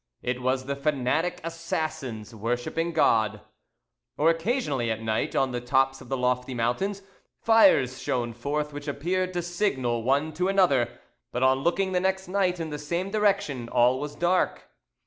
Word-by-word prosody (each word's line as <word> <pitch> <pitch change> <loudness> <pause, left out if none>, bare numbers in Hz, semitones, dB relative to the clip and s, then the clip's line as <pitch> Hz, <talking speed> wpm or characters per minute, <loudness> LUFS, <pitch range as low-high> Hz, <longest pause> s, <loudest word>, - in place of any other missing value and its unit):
It 125 +1 -2
was 130 +1 0
the 140 +1 -2
fanatic 150 +4 0
assassins 155 -9 -4
worshipping 120 +9 -2
God. 110 -9 +2 0.8
Or 160 +3 +4
occasionally 165 - -1
at 110 0 -2
night, 110 0 -1
on 135 -1 +2
the 120 0 -3
tops 135 +2 +1
of 125 - -13
the 135 - -1
lofty 125 0 0
mountains, 190 - -1 0.4
fires 225 - +4
shone 120 -2 -1
forth 150 +5 -3
which 145 +1 -7
appeared 180 +6 -1
to 175 -1 -2
signal 135 - -1
one 140 +6 +1
to 180 +3 0
another, 180 -11 +2 0.3
but 125 - -1
on 130 0 +4
looking 190 +6 0
the 180 - +2
next 190 0 -1
night 185 -2 0
in 160 -2 -4
the 150 - -4
same 170 +6 -3
direction 200 - 0
all 125 +2 +3
was 145 +1 -5
dark. 175 +3 0
145 Hz, 165 wpm, -26 LUFS, 125-175 Hz, 0.8 s, Or